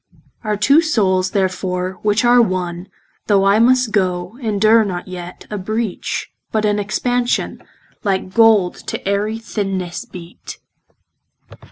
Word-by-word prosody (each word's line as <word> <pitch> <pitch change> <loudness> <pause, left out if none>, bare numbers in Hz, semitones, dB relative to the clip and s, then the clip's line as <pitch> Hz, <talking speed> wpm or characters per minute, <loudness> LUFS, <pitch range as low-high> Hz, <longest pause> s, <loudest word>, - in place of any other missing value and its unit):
Our 210 -1 -1
two 275 +10 +5
soules 190 - +1
therefore, 185 -1 -2
which 210 +3 +1
are 240 0 +6
one, 180 -3 -2 0.4
Though 195 -2 +3
I 200 +2 +4
must 250 0 +3
goe, 185 -1 -1
endure 220 0 +3
not 185 -3 -4
yet 180 -1 -8
A 210 - -3
breach, 215 +1 -3 0.2
but 215 -1 0
an 210 0 +1
expansion, 240 +4 -1 0.4
Like 190 -2 -1
gold 220 -6 +4
to - - -2
ayery 205 +2 0
thinnesse 195 -6 -4
beate. 175 -1 -10
205 Hz, 130 wpm, -18 LUFS, 185-225 Hz, 0.4 s, are